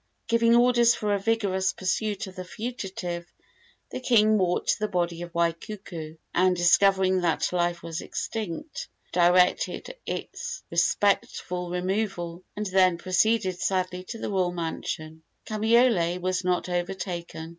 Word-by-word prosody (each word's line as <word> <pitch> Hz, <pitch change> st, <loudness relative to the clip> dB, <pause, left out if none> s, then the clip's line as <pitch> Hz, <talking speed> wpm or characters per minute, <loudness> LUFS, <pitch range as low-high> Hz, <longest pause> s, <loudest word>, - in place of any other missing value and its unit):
Giving 230 Hz, 0 st, +4 dB
orders 240 Hz, -1 st, +5 dB
for 210 Hz, -1 st, -1 dB
a 200 Hz, -, +1 dB
vigorous 195 Hz, -3 st, 0 dB
pursuit 205 Hz, +2 st, -1 dB
of 190 Hz, -1 st, -11 dB
the 185 Hz, -, -5 dB
fugitive, 185 Hz, -5 st, -5 dB, 0.6 s
the -, -, -4 dB
king 215 Hz, -4 st, +4 dB
walked 185 Hz, -4 st, +1 dB
to -, -, +2 dB
the 215 Hz, -, 0 dB
body 175 Hz, -3 st, -1 dB
of 175 Hz, 0 st, -7 dB
Waikuku, 170 Hz, -1 st, -3 dB, 0.2 s
and, 185 Hz, 0 st, +3 dB
discovering 190 Hz, +1 st, +4 dB
that 170 Hz, +1 st, 0 dB
life 175 Hz, -1 st, 0 dB
was 165 Hz, 0 st, -4 dB
extinct, 225 Hz, -, -5 dB, 0.2 s
directed 180 Hz, -, +2 dB
its 480 Hz, 0 st, -5 dB
respectful 180 Hz, 0 st, +1 dB
removal, 180 Hz, -1 st, -2 dB
and 210 Hz, -, -3 dB
then 185 Hz, -2 st, +3 dB
proceeded 185 Hz, +1 st, +1 dB
sadly 185 Hz, -1 st, -1 dB
to 230 Hz, -, -6 dB
the 220 Hz, -, -4 dB
royal 185 Hz, -2 st, +1 dB
mansion. 160 Hz, -2 st, -5 dB, 0.2 s
Kamaiole 215 Hz, -5 st, +3 dB
was 185 Hz, +1 st, -1 dB
not 180 Hz, 0 st, 0 dB
overtaken. 175 Hz, -2 st, -4 dB
185 Hz, 135 wpm, -26 LUFS, 175-215 Hz, 0.6 s, orders